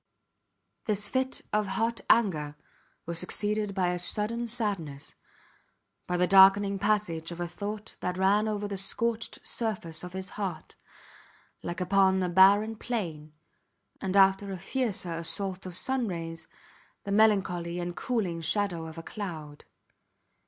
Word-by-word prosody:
This 210 -1 0
fit 260 0 -1
of 210 -1 +1
hot 225 +3 -1
anger 155 -10 +2 0.5
was 170 0 -1
succeeded 210 +2 0
by 185 -2 +1
a 180 0 -2
sudden 215 +6 0
sadness, 195 - -2 0.9
by 180 - 0
the 180 - +3
darkening 195 +1 +6
passage 200 -6 0
of 170 0 -8
a 175 - -2
thought 205 +4 -6
that 180 0 -3
ran 200 +3 +3
over 210 -1 -2
the 200 -1 -4
scorched 230 +4 -2
surface 190 -8 -2
of 180 0 -8
his 190 0 -5
heart, 185 -6 -5 0.9
like 175 +1 -5
upon 190 0 +3
a 180 - 0
barren 200 +5 +5
plain, 165 -11 -4 0.7
and 190 +1 0
after 195 +1 +4
a 190 - -4
fiercer 195 -3 -2
assault 185 +3 -3
of 180 - -5
sunrays, 175 -10 0 0.6
the 200 - -5
melancholy 190 -5 +2
and 175 0 -4
cooling 195 -9 -2
shadow 175 -2 -1
of 160 +1 -10
a 165 - -7
cloud. 160 -9 -7
195 Hz, 140 wpm, -28 LUFS, 175-210 Hz, 0.9 s, darkening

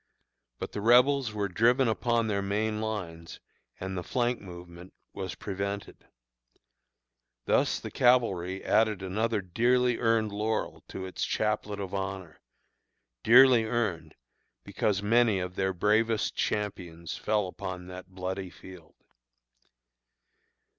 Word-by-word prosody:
But - - -6
the 105 - -5
Rebels 125 +2 +4
were 105 -1 -2
driven 115 +7 +3
upon 115 +1 +1
their 100 -2 -1
main 105 +2 -1
lines, 90 -7 -5 0.4
and 95 +1 -4
the 90 - -2
flank 120 +5 -1
movement 90 -1 -11 0.2
was 95 -1 -5
prevented. 100 0 -5 1.4
Thus - - +2
the - - -7
cavalry 95 -7 +2
added 110 -3 +2
another 105 +3 -1
dearly 120 +6 +1
earned 115 -2 +2
laurel 110 +2 -2
to 95 - -6
its 95 - -4
chaplet 105 -1 -1
of 95 -1 -5
honor 95 -4 -5 0.8
dearly 125 0 +7
earned, 100 -9 -2 0.5
because 100 +7 -1
many 115 -1 +3
of 90 0 -4
their 95 0 0
bravest 110 +4 +1
champions 90 -5 -3
fell 105 -2 0
upon 90 0 -6
that 90 0 -10
bloody 95 0 -5
field. 90 -2 -14
100 Hz, 120 wpm, -28 LUFS, 95-115 Hz, 1.4 s, dearly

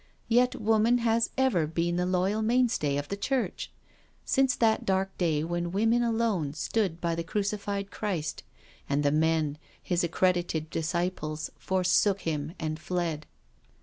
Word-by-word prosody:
Yet 245 +2 +3
woman 225 +2 +3
has 230 -1 +2
ever 230 -12 +2
been 170 +2 -1
the 180 0 0
loyal 190 +4 +1
mainstay 225 - +2
of 145 0 -4
the 200 - -2
Church; 260 +5 -2 0.6
since 265 -2 +2
that 225 -2 +2
dark 190 0 0
day 160 -4 +1
when 175 +1 -2
women 225 +5 +2
alone 225 -10 0
stood 185 -1 -1
by 170 -1 -1
the 165 0 -2
Crucified 200 +1 -2
Christ, 185 -8 -3 0.5
and 140 +1 +1
the 145 - +3
men. 155 -1 +1 0.2
His 175 -1 -1
accredited 170 -2 0
disciples, 160 -2 -2
forsook 190 +1 +2
Him 155 +1 -3
and 155 -1 -3
fled. 165 -4 -3
180 Hz, 145 wpm, -28 LUFS, 160-215 Hz, 0.6 s, Yet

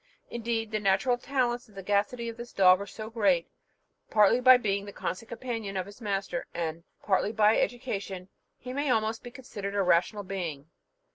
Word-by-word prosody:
Indeed 225 -1 -2
the 215 - 0
natural 205 +5 +2
talents 245 -2 -1
and 210 - -21
sagacity 205 +5 0
of 230 - -5
this 240 +1 -9
dog 185 -1 +6
are 200 - -5
so 215 +2 -8
great, 195 -7 +2 0.6
partly 210 +3 +5
by 255 0 +8
being 200 -4 -1
the 200 - -8
constant 200 +3 -5
companion 225 -5 -4
of 185 - -1
his 205 +4 -13
master, 195 -4 -2
and 165 -1 -3 0.2
partly 200 +1 +1
by 215 -1 +4
education, 200 -6 -2
that 185 - -24 0.3
he 250 - -5
may 285 +1 -1
almost 220 -1 +1
be 245 - -8
considered 205 -6 -7
a 200 - +2
rational 185 +4 +2
being. 170 -6 -5
210 Hz, 185 wpm, -28 LUFS, 195-235 Hz, 0.6 s, by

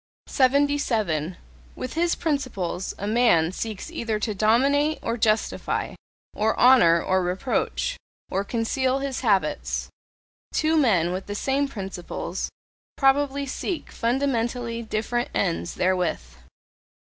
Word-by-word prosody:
77. 250 - +1 0.4
With 255 - -5
his 340 +1 +1
principles 245 - -2
a 200 - -5
man 210 -7 +3
seeks 215 - -5
either 230 -9 -2
to 215 - -1
dominate, 275 +9 +3
or 230 - -1
justify, 215 -1 0 0.4
or 220 +1 0
honour, 235 -10 +6
or 185 0 +2
reproach, 190 - -1 0.3
or 195 +1 0
conceal 255 +4 0
his 275 -1 -3
habits: 230 +5 0 0.6
two 315 +1 +1
men 190 - +3
with 185 +1 -5
the 205 - -4
same 275 +5 0
principles 195 -8 -5 0.5
probably 280 0 +2
seek 315 +5 -4
fundamentally 235 -1 -1
different 230 +2 -2
ends 170 -2 -1
therewith. 180 - +1
230 Hz, 110 wpm, -25 LUFS, 195-275 Hz, 0.6 s, honour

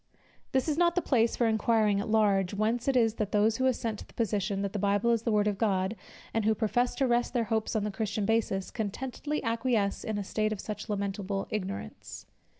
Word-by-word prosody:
This 265 +2 +1
is 310 +1 0
not 345 -1 +3
the 360 - +2
place 235 -4 +2
for 240 - +1
inquiring 220 -2 +2
at 205 - -3
large, 200 -3 +2
whence 225 +4 0
it 270 -2 +3
is 225 -3 +3
that 210 -2 -2
those 215 +2 +3
who 260 - +2
assent 230 -4 -1
to - - -10
the - - -21
position, 200 -3 -1
that 200 - -3
the 210 - -2
Bible 205 +3 +2
is 230 -2 +2
the 230 - -1
word 210 -1 +3
of 205 -2 -1
God, 190 -1 +1 0.4
and 225 - +1
who 220 +1 +3
profess 240 +3 0
to 275 - +1
rest 240 0 +1
their 240 - +3
hopes 220 0 -1
on 215 - +1
the 210 - -2
Christian 210 0 -2
basis, 205 -3 0
contentedly 260 +7 -3
acquiesce 230 -3 0
in 215 -1 -2
a 205 - -2
state 215 +2 -1
of 215 - -3
such 215 +2 -6
lamentable 200 -1 -2
ignorance. 185 - -5
215 Hz, 225 wpm, -29 LUFS, 200-235 Hz, 0.4 s, not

